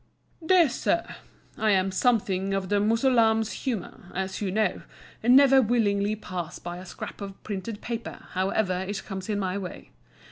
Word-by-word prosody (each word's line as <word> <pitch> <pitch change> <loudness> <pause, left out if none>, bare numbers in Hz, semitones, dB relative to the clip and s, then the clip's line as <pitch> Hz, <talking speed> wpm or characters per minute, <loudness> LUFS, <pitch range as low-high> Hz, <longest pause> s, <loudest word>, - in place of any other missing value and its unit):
DEAR 345 0 +5
SIR,—I 220 -3 -3
am 190 -1 +3
something 195 -3 +1
of 190 -1 -2
the 205 - +3
Mussulman's 225 0 +3
humour, 205 -7 -5
as 190 +1 -3
you 200 - -1
know, 210 -1 0 0.4
and 245 +3 +5
never 270 -1 +7
willingly 210 -3 +1
pass 180 -5 -6
by 175 0 -6
a 185 +1 -10
scrap - - -8
of 195 -1 -8
printed 205 +1 -5
paper, 235 -1 -6
however 185 0 0
it 205 0 -4
comes 190 0 -6
in 210 - 0
my 190 0 -1
way. 185 -2 -8
205 Hz, 155 wpm, -26 LUFS, 190-230 Hz, 0.4 s, never